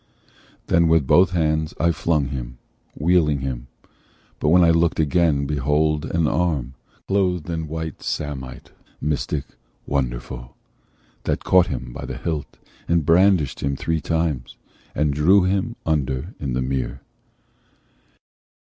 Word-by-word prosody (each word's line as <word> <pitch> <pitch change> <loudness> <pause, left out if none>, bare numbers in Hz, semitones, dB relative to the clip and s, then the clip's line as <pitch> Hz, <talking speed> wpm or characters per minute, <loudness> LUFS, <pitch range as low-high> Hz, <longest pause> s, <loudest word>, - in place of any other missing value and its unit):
Then 85 0 +3
with 80 -3 +3
both 90 +7 +5
hands 80 -2 0
I 85 - +3
flung 80 -4 0
him, 60 -3 -6 0.4
wheeling 75 -3 +2
him; 65 -1 -4 0.7
But - - +1
when 90 +2 +6
I 85 - +5
looked 85 0 +2
again, 80 -2 +2
behold 75 +2 +1
an 85 -2 0
arm, 75 -7 0 0.3
Clothed 90 -4 0
in 80 -1 -3
white 80 0 -5
samite, 65 -3 -5 0.3
mystic, 75 -1 -2 0.4
wonderful, - - -3 0.7
That - - -1
caught 90 -1 +5
him - - -5
by - - -6
the - - -6
hilt, 80 -4 -4 0.3
and 85 -3 +2
brandished 90 -3 +3
him 70 0 -1
Three 80 +3 -1
times, 80 -7 -2 0.4
and 75 0 +1
drew 90 +7 +5
him 95 +5 0
under 70 -5 -1
in 65 -3 -3
the 65 +1 0
mere." 65 0 -3
75 Hz, 130 wpm, -22 LUFS, 70-85 Hz, 0.7 s, when